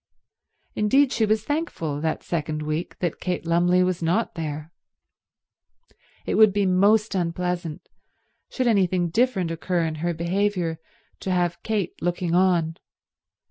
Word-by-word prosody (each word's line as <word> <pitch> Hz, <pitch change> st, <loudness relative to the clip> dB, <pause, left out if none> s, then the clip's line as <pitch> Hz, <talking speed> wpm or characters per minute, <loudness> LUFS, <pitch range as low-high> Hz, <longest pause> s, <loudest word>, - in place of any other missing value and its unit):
Indeed 265 Hz, +6 st, +3 dB
she 220 Hz, -, +1 dB
was 215 Hz, 0 st, +1 dB
thankful, 220 Hz, -, -3 dB
that 160 Hz, 0 st, -2 dB
second 155 Hz, -2 st, -3 dB
week, 155 Hz, +3 st, -3 dB
that 175 Hz, -3 st, -2 dB
Kate 180 Hz, -2 st, -3 dB
Lumley 175 Hz, +2 st, +3 dB
was 180 Hz, -1 st, -1 dB
not 175 Hz, +8 st, 0 dB
there. 155 Hz, -1 st, -5 dB, 1.5 s
It -, -, -1 dB
would 215 Hz, -1 st, +6 dB
be 200 Hz, 0 st, +1 dB
most 205 Hz, +4 st, +3 dB
unpleasant, 175 Hz, -2 st, -2 dB, 0.6 s
should 255 Hz, -, -2 dB
anything 185 Hz, -6 st, +2 dB
different 215 Hz, -5 st, +1 dB
occur 170 Hz, +1 st, -1 dB
in 160 Hz, -, -2 dB
her 170 Hz, 0 st, -1 dB
behaviour, 175 Hz, -1 st, -1 dB, 0.4 s
to -, -, -5 dB
have 175 Hz, -1 st, 0 dB
Kate 210 Hz, -5 st, -1 dB
looking 175 Hz, -1 st, -1 dB
on. 175 Hz, -3 st, +2 dB
180 Hz, 135 wpm, -24 LUFS, 165-205 Hz, 1.5 s, would